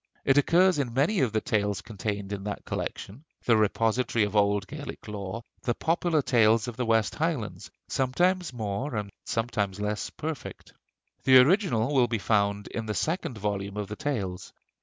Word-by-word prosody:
It 135 +1 +5
occurs 175 +3 +4
in 120 -4 -2
many 160 +10 +2
of 130 -6 +2
the 110 0 0
tales 105 -2 0
contained 105 -2 -4
in 100 -1 -5
that 105 - -5
collection, 115 +10 -5 0.2
the 115 - +5
repository 110 +1 +2
of 105 +1 -5
old 100 -1 +3
Gaelic - - -8
lore, 105 +2 -5 0.2
the 120 - -1
'Popular 165 -2 +1
Tales 115 -3 +4
of 120 - -5
the 125 -1 -2
West 115 -2 +2
Highlands,' 155 -9 -2 0.2
sometimes 175 +7 +1
more 115 +3 -3
and 105 -1 -3
sometimes 105 -4 -1
less 105 0 -2
perfect. 155 -3 -7 0.5
The 130 -1 +7
original 145 - +4
will 130 -3 +4
be 115 -1 -1
found 100 -1 +1
in 115 -1 -4
the 105 - -2
second 160 -7 -2
volume 100 -1 -3
of 105 -2 -3
the 105 - -4
Tales.... 105 - -3
115 Hz, 170 wpm, -27 LUFS, 105-135 Hz, 0.5 s, The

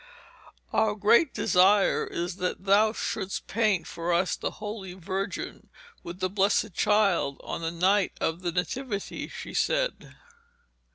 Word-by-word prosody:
'Our 215 -1 +2
great 215 +9 +4
desire 195 +2 +3
is 175 +2 -4
that 180 0 -3
thou 205 +3 +5
shouldst 195 -3 -4
paint 210 -5 +1
for 170 +1 -3
us 175 +2 +2
the - - -3
Holy 210 -3 -6
Virgin 190 +2 -5 0.3
with 175 +2 -8
the 185 - +2
Blessed 200 +1 +1
Child 195 -9 +2
on - - -5
the 165 - -1
night 185 +4 +2
of 160 +2 -1
the 175 -1 -1
Nativity,' 200 +4 -3
she - - -8
said. - - -1
195 Hz, 135 wpm, -27 LUFS, 180-210 Hz, 0.3 s, thou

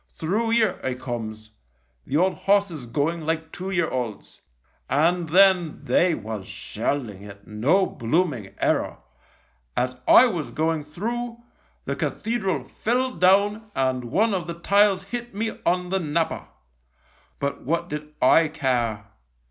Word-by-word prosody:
Through 220 +8 -1
'ere 220 -5 +2
I 130 - -1
comes, 110 -4 -6 0.6
the 145 - +1
old 185 +3 +3
horses 195 -10 +1
going 155 +7 -1
like 160 0 -2
two 185 +2 -5
year 175 -4 +1
olds. 120 -7 -5 0.5
And 165 +4 +2
then 180 -2 +4
they 175 -2 +3
was 110 -4 -6
shelling 115 -9 -3
it, 100 0 -12
no 135 - +2
blooming 120 - -1
error. - - 0 0.8
As 125 +1 0
I 250 - +9
was 175 - -2
going 160 -1 -1
through, 235 +9 -4 0.4
the - - -2
cathedral 195 - -1
fell 250 - -1
down 205 +2 +3
and 130 -2 0
one 205 - +2
of 180 -3 -2
the 170 - -4
tiles 200 +2 +3
hit 240 +3 -6
me 220 +2 -3
on 180 +1 +1
the 190 +1 +1
napper. 165 0 -1 0.9
But 140 0 -3
what 170 +4 -1
did 150 -1 -6
I 160 +5 +5
care 125 -8 -1
165 Hz, 140 wpm, -24 LUFS, 130-195 Hz, 0.9 s, I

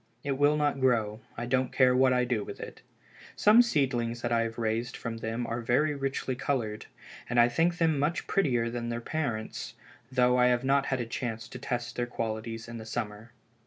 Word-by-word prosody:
It 140 - -2
will 145 +2 +3
not 145 -2 +1
grow, 115 -4 +1 0.2
I 120 - -3
don't 130 +1 +1
care 125 -1 +4
what 130 0 +5
I 125 0 +2
do 120 -4 -1
with - - -8
it. - - -8 0.5
Some 215 +3 +7
seedlings 125 - 0
that 120 - -1
I 115 -1 +3
have 115 0 -3
raised 115 +2 -1
from 115 -1 -5
them 115 +2 -3
are 115 +1 -3
very 140 +6 +2
richly 135 -1 -2
colored, 115 -6 -2 0.4
and 120 0 +2
I 120 - +7
think 165 +8 +1
them 160 -4 +2
much 150 +4 0
prettier 125 -11 +1
than 120 -1 -3
their 115 0 -2
parents, 120 -5 -4 0.4
though 125 -1 +3
I 125 - +5
have 125 0 +2
not 135 +1 +2
had 130 -2 0
a - - -2
chance 115 -1 -4
to 125 - -8
test 120 -2 -3
their 120 0 -1
qualities 115 0 -4
in 115 0 -7
the 110 - -8
summer." 110 0 -5
120 Hz, 205 wpm, -29 LUFS, 115-135 Hz, 0.5 s, Some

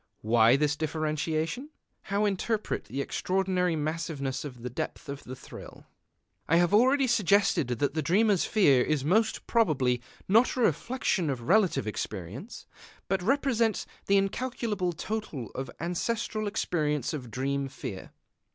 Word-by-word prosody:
Why 115 +2 +5
this 150 +1 +1
differentiation? 155 - -2 0.4
How 200 +2 +1
interpret 210 +2 -1
the 130 +7 -4
extraordinary 180 +1 0
massiveness 150 -3 -3
and 125 -4 -7
depth 140 - -5
of 140 0 -6
the 130 - -7
thrill? - - -12 0.6
I 165 - +4
have 175 +2 +3
already 260 +6 +5
suggested 200 - +3
that 130 +3 -1
the 155 - 0
dreamer's 195 +5 +3
fear 145 - +4
is 145 -1 0
most 220 +7 +2
probably 135 - +2 0.3
not 225 +6 +4
a 255 - -1
reflection 190 - +1
of 130 -3 -2
relative 190 - +2
experience, 105 - -6 0.4
but 195 -1 +1
represents 235 -1 +1 0.2
the 200 - +5
incalculable 210 -2 -1
total 165 - -5
of 130 -1 -5
ancestral 215 +5 -2
experience 150 - -1
of 130 -6 -5
dream 135 +4 -2
fear. 115 -7 -7
165 Hz, 135 wpm, -28 LUFS, 140-210 Hz, 0.6 s, Why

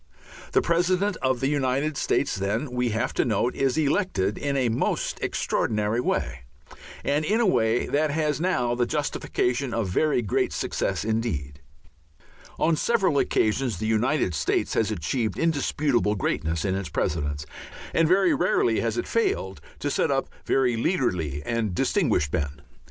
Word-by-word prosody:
The - - +4
President 180 +4 +1
of 130 -2 0
the 135 - +2
United 140 +1 0
States, 140 - 0
then, 110 +8 -2
we 125 -1 0
have 115 +4 -1
to - - +2
note, 120 +2 0
is 135 0 +1
elected 145 - +1
in 140 -1 -2
a 130 -2 +2
most 115 +1 -1
extraordinary 105 +2 0
way, - - -1 0.7
and 145 +2 +1
in 210 +8 +1
a 235 - +3
way 120 - +2
that 150 +2 +1
has 150 0 0
now 125 -10 +1
the 120 0 0
justification 140 -3 -1
of 110 -5 -1
very 135 - +1
great 100 - 0
successes - - -2
indeed. 75 - -2 1.0
On 165 - +2
several 190 -5 +2
occasions 110 -1 +1
the 110 - -3
United 110 - +1
States 70 -3 0
has 110 - +1
achieved 110 - -2
indisputable 145 -8 +1
greatness 80 -3 -1
in 95 - +1
its 95 -3 -3
Presidents, 75 -1 -2 0.5
and 165 -1 +3
very 195 - +4
rarely 285 - +2
has - - -1
it - - -2
failed 420 -3 -1 0.2
to - - -2
set - - +1
up - - 0 0.2
very 125 -3 +2
leaderly 90 - -1
and 115 -5 -1
distinguished 75 -4 +1
men. 70 -4 -2
125 Hz, 155 wpm, -25 LUFS, 105-150 Hz, 1.0 s, The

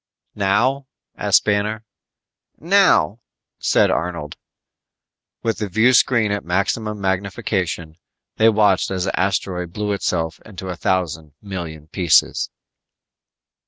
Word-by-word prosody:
"Now?" 115 +8 +1 0.3
asked - - +3
Banner. 105 +2 0 0.7
"Now," 165 - +3 0.4
said - - +3
Arnold. 85 -4 -3 1.1
With 115 -1 -1
the 105 -2 -3
viewscreen 115 +1 +3
at 100 - -2
maximum 100 +4 -1
magnification, 95 -4 -2 0.4
they 110 +1 +5
watched 105 -4 +3
as 95 -2 -2
the 95 - -2
asteroid 90 -2 -1
blew 105 +1 -2
itself 85 -4 -2
into 95 -3 -8
a 90 - -3
thousand 80 -4 -2
million 85 -7 -7
pieces. 90 -4 +2
100 Hz, 105 wpm, -20 LUFS, 90-110 Hz, 1.1 s, they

